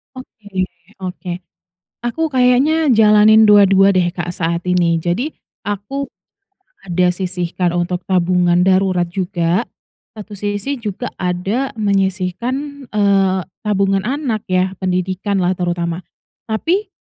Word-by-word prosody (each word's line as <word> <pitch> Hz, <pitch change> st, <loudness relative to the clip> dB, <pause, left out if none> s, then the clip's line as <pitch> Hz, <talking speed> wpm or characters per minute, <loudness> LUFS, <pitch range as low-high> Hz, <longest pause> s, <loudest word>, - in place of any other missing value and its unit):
Oke. 225 Hz, -5 st, -13 dB, 0.5 s
Oke, 180 Hz, -1 st, -5 dB, 0.7 s
aku 320 Hz, +6 st, -1 dB
kayaknya 270 Hz, +5 st, +3 dB
jalanin 215 Hz, 0 st, +6 dB
dua-dua 195 Hz, -1 st, +6 dB
deh, 185 Hz, -3 st, +2 dB
Kak, 175 Hz, -1 st, -4 dB
saat 170 Hz, 0 st, -2 dB
ini. 170 Hz, -2 st, +2 dB
Jadi, 195 Hz, -, -2 dB, 0.3 s
aku 205 Hz, +8 st, -3 dB, 0.8 s
ada 180 Hz, 0 st, +1 dB
sisihkan 180 Hz, -1 st, -2 dB
untuk 175 Hz, +1 st, -1 dB
tabungan 180 Hz, -1 st, +2 dB
darurat 185 Hz, -2 st, +2 dB
juga. 180 Hz, +1 st, -1 dB, 0.5 s
Satu 210 Hz, -1 st, -9 dB
sisi 205 Hz, +7 st, -3 dB
juga 215 Hz, +2 st, -4 dB
ada 190 Hz, +9 st, -1 dB
menyisihkan, 210 Hz, +8 st, -2 dB
eee, 195 Hz, -2 st, +2 dB, 0.2 s
tabungan 195 Hz, -2 st, +1 dB
anak 255 Hz, -5 st, -2 dB
yah, 185 Hz, +1 st, +1 dB
pendidikanlah 185 Hz, 0 st, 0 dB
terutama. 175 Hz, -1 st, -2 dB, 0.5 s
Tapi 355 Hz, -, 0 dB
195 Hz, 105 wpm, -18 LUFS, 180-220 Hz, 0.8 s, jalanin